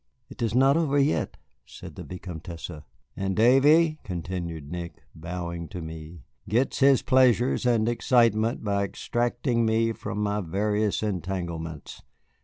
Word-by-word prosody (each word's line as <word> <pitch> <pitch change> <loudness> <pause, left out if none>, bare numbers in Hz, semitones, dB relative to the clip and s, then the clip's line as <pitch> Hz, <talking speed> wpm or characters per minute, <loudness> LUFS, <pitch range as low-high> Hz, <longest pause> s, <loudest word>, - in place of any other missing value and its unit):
"It 135 - -11
is 115 -1 0
not 135 +3 +5
over 150 -4 +1
yet," 140 +2 +1 0.3
said - - -11
the - - -9
Vicomtesse. 85 -2 -8 0.4
"And 95 -1 -2
Davy," 150 - +5
continued 85 -4 -5
Nick, 85 -2 -7
bowing 85 0 -5
to 90 +1 -7
me, 80 -1 -9 0.3
"gets 120 +5 +1
his 135 -1 +5
pleasures 125 -1 +3
and 115 -2 +2
excitement 115 -2 +2
by 100 -1 0
extracting 120 +3 -1
me 115 0 +2
from 105 - -6
my 105 0 0
various 105 +4 0
entanglements. 85 -5 -4
105 Hz, 130 wpm, -26 LUFS, 85-120 Hz, 0.4 s, not